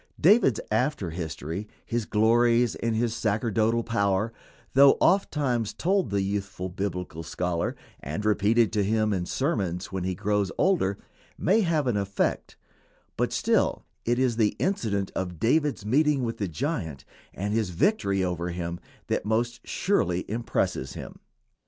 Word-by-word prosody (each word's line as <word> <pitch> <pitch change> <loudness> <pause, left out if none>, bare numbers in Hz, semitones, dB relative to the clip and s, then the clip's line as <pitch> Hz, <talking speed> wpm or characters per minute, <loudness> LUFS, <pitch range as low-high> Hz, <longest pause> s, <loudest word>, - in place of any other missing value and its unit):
David's 180 - +5
after 110 - 0
history, 80 +3 -5 0.2
his 115 -2 -2
glories 115 +2 +3
and 115 -1 -2
his 115 0 0
sacerdotal 110 +1 +1
power, 105 -1 0 0.4
though 140 +1 +7
ofttimes 140 - +1
told 190 +1 +1
the 100 -1 0
youthful 100 -2 -3
Biblical 90 -4 -4
scholar 85 +1 -2 0.2
and 80 +9 -5
repeated 110 +2 +3
to 105 -2 +2
him 110 +1 +1
in 90 -2 -2
sermons 100 - -1
when 95 -2 -3
he 95 0 -1
grows 105 0 0
older, 165 - +2 0.4
may 205 +6 +3
have 165 -6 +1
an 120 -5 +1
effect, 100 0 -1 0.6
but - - 0
still - - +1 0.2
it 120 +1 +1
is 125 -3 +1
the 110 -3 +2
incident 105 - -1
of 90 -3 -3
David's 145 - +1
meeting 145 +3 +2
with 115 -1 -3
the 100 - -1
giant 85 - -3 0.3
and 100 +2 -3
his 110 -4 0
victory 100 - +1
over 90 -1 -2
him 85 0 -4 0.3
that - - -1
most 120 +3 0
surely 90 - 0
impresses 105 - -2
him. - - -9
105 Hz, 145 wpm, -26 LUFS, 95-120 Hz, 0.6 s, though